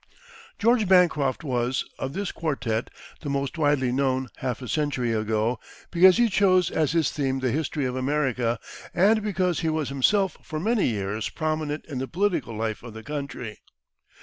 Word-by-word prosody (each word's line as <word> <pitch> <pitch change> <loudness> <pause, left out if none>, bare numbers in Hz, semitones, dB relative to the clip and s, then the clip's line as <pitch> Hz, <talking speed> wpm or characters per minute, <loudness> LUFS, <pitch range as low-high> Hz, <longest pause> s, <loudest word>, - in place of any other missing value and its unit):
George 230 -1 +3
Bancroft 165 -7 +3
was, 125 -2 -1
of 135 +1 -3
this 200 +1 -3
quartette, 125 -8 -2 0.3
the 145 - -5
most 140 +2 -2
widely 145 -4 +2
known 130 -1 0
half 125 -3 -3
a - - -6
century 135 -5 0
ago, 110 +2 0 0.3
because 185 +2 +6
he 240 0 +4
chose 185 -4 +3
as 155 -1 +1
his 165 -3 +2
theme 135 -2 -1
the 130 -2 0
history 150 -1 -1
of 125 0 -2
America, 130 -3 0 0.4
and 215 +5 +4
because 185 -4 0
he 160 - 0
was 155 -4 -1
himself 190 +9 +2
for 155 - -5
many 220 +4 +2
years 105 -1 -2
prominent 155 -1 -2
in 135 -5 -5
the 130 - -3
political 175 - -1
life 110 -1 -2
of 115 -2 -10
the 110 - -8
country. 140 -6 -5
140 Hz, 170 wpm, -25 LUFS, 125-170 Hz, 0.4 s, because